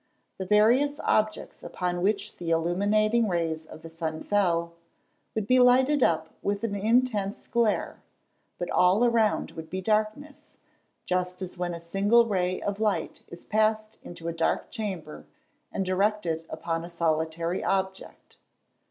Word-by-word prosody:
The 190 - -4
various 245 - +3
objects 215 0 0
upon 180 -1 -3
which 200 +2 -1
the 170 - -5
illuminating 205 +7 +2
rays 165 -3 -2
of 160 - -12
the 165 - -8
sun 160 -1 -4
fell, 170 -5 +1 0.6
would 215 -2 -1
be 255 +4 +4
lighted 260 +3 +5
up 160 -6 +1
with 200 +1 -2
an 225 -3 -1
intense 215 -1 0
glare, 235 -3 0 0.6
but 175 - -4
all 185 +6 +4
around 230 -3 +2
would 160 -1 -9
be 185 - -3
darkness, 215 +8 -2 0.5
just 180 0 -1
as 185 - -6
when 175 -1 -3
a - - -7
single 200 +7 +3
ray 185 -4 0
of 205 0 -3
light 215 -2 -1
is 170 - -12
passed 215 0 0
into 170 -1 -9
a 170 - -2
dark 165 0 -1
chamber, 180 - -6 0.4
and 195 - -2
directed 185 -4 0
upon 165 +1 -3
a 170 - -8
solitary 165 +1 -1
object. 190 0 -3
195 Hz, 145 wpm, -27 LUFS, 170-215 Hz, 0.6 s, lighted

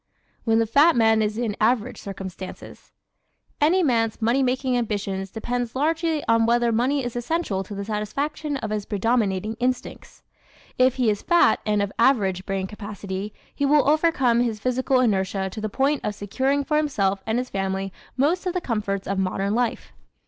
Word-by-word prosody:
When 225 -1 +3
the 225 - +3
Fat 285 +8 +5
Man 225 -1 +4
is 210 0 -1
in 230 -4 -1
Average 240 +2 +1
Circumstances 190 -1 -8 0.6
¶ - - -46
Any 360 +5 +4
man's 230 -6 +1
money 235 +4 +2
making 255 0 0
ambitions 200 -4 -2
depend 240 +3 -3
largely 320 +2 0
on 230 0 +3
whether 240 0 +3
money 255 +5 +1
is 245 -1 -4
essential 240 - -1
to 200 +2 -8
the 200 0 -4
satisfaction 280 +8 -3
of 220 -5 -5
his 210 -1 -3
predominating 215 -1 0
instincts. 250 +1 -3 0.6
If 255 0 +4
he 245 -4 +2
is 205 - -3
fat 345 -1 +4
and 210 -1 +2
of 200 - -3
average 195 -7 +2
brain 195 -1 -1
capacity 200 0 -6 0.2
he - - -3
will 285 0 +4
overcome 290 -6 +3
his 230 -3 0
physical 255 +2 +1
inertia 190 -4 0
to 215 - -6
the 215 - -2
point 275 +6 0
of 210 - -2
securing 265 +8 0
for 300 +2 0
himself 200 -11 0
and 220 +1 +1
his 250 +1 -3
family 195 0 -2 0.2
most 335 +8 +1
of 360 - -1
the - - +2
comforts 205 - -2
of 195 0 -1
modern 195 +2 -1
life. 240 0 -1
230 Hz, 180 wpm, -24 LUFS, 200-265 Hz, 0.6 s, Fat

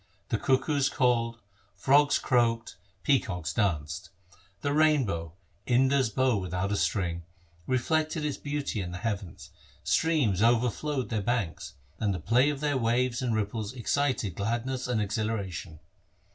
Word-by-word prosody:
The 115 - 0
cuckoos 140 +1 +2
called, 115 -3 +1 0.4
frogs 145 +2 +4
croaked, 115 -2 +1 0.3
peacocks 90 - 0
danced. 75 -8 -1 0.5
The 145 0 0
rain 155 -3 +4
bow 85 -5 -4 0.2
— 90 +3 -38
Indar's 130 0 +3
bow 130 0 +2
without 95 +1 -2
a - - +1
string 90 -5 0 0.3
— 85 0 -31
reflected 155 +3 0
its 150 - -2
beauty 145 -7 -3
in 90 -1 -5
the - - -4
heavens, 100 -3 -5 0.3
streams 140 - +2
overflowed 125 +4 +1
their 110 -3 -1
banks, 110 -8 -2 0.2
and 100 -3 0
the - - -4
play 120 - +3
of 145 -1 -3
their 145 -3 +1
waves 120 +1 +1
and 120 -3 0
ripples 110 +1 -2
excited 130 - 0
gladness 120 +7 -2
and 125 -3 0
exhilaration. 100 -6 -3
115 Hz, 145 wpm, -28 LUFS, 100-135 Hz, 0.5 s, frogs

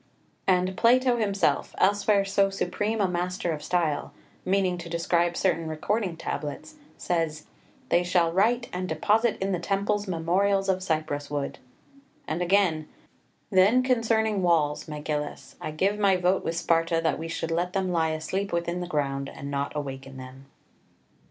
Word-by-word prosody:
6 - - -37 0.4
And 185 0 +2
Plato 245 +2 +4
himself, 200 -3 0
elsewhere 200 +1 +3
so 195 0 +2
supreme 205 +3 -2
a 200 - +3
master 180 0 -2
of 155 -2 -4
style, 165 -5 0 0.3
meaning 185 -1 +1
to 170 0 -8
describe 170 +1 +1
certain 165 -4 +1
recording 180 +3 -2
tablets, 150 - -5 0.2
says, 165 -3 -2 0.4
"They 175 - +4
shall 175 -2 +2
write, 230 +7 +2
and 185 +1 -3
deposit 215 +8 +2
in 195 +1 -1
the 180 - 0
temples 200 +3 -1
memorials 195 +3 +1
of 185 -1 +1
cypress 155 -5 -2
wood"; 145 -1 -3 0.7
and 160 +3 -2
again, 175 -4 +2 0.6
"Then 200 +7 +5
concerning 225 -4 +1
walls, 160 -5 +1
Megillus, 150 -1 -4
I - - -3
give 195 +7 0
my 200 -2 +4
vote 180 +1 +1
with 165 - -2
Sparta 165 -1 +2
that 160 -3 +1
we 165 - -4
should 165 0 -3
let 175 +2 -1
them 190 -2 0
lie 165 -2 +1
asleep 190 +6 -2
within 170 +1 -1
the 175 - -4
ground, 140 -4 -2
and 140 +1 -7
not 140 +1 -2
awaken 135 -2 -6
them." 130 +1 -11
180 Hz, 160 wpm, -26 LUFS, 160-195 Hz, 0.7 s, Then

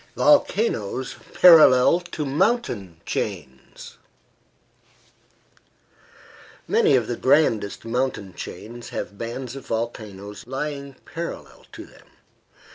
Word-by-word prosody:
VOLCANOES 160 - +1 0.2
PARALLEL 160 -3 +7
TO 175 -4 -6
MOUNTAIN 135 - -1
CHAINS 75 -11 -6 2.7
Many - - +3
of 120 -3 +2
the 120 - -3
grandest 115 -8 +1
mountain 115 -5 -2
chains 120 +7 -9
have 100 - -6
bands 120 +2 -5
of 135 - -10
volcanoes 110 -2 -5
lying 140 +1 -5
parallel 170 +1 -8
to - - -9
them. - - -20
125 Hz, 90 wpm, -23 LUFS, 105-145 Hz, 2.7 s, PARALLEL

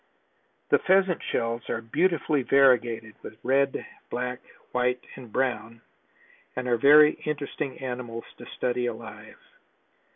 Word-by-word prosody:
The - - +5
Pheasant 190 -2 +3
shells 115 0 -2
are - - -1
beautifully 150 +5 +1
variegated 120 -5 +3
with 110 - -10
red, 135 +1 +1 0.2
black, 125 0 -3 0.3
white 125 0 0
and 125 -4 -11
brown 115 -3 -2 0.7
and 125 0 -3
are 120 - +3
very 150 +4 +7
interesting 145 -2 -4
animals 125 -3 -5 0.2
to - - -10
study 125 0 -2
alive. 115 -1 -8
125 Hz, 120 wpm, -26 LUFS, 115-140 Hz, 0.7 s, very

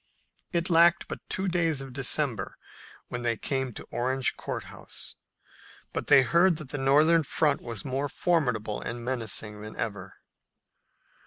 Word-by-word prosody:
It 170 +1 0
lacked 170 +1 +5
but - - -6
two 190 +1 +1
days 165 -5 +1
of 135 -2 -7
December 135 -1 -1 0.5
when 120 - -4
they 115 -1 0
came 130 0 -2
to - - -9
Orange 130 +2 0
Court - - -5
House, - - -8 0.8
but - - -3
they 135 - +7
heard 170 +6 +4
that 155 -4 -7
the 145 - -3
Northern 150 +5 +5
front 150 0 +1
was 115 -4 -4
more 135 +2 -1
formidable 125 - 0
and 120 0 -5
menacing 110 -4 -2
than 105 0 -8
ever. 100 -4 -5
135 Hz, 150 wpm, -28 LUFS, 120-160 Hz, 0.8 s, they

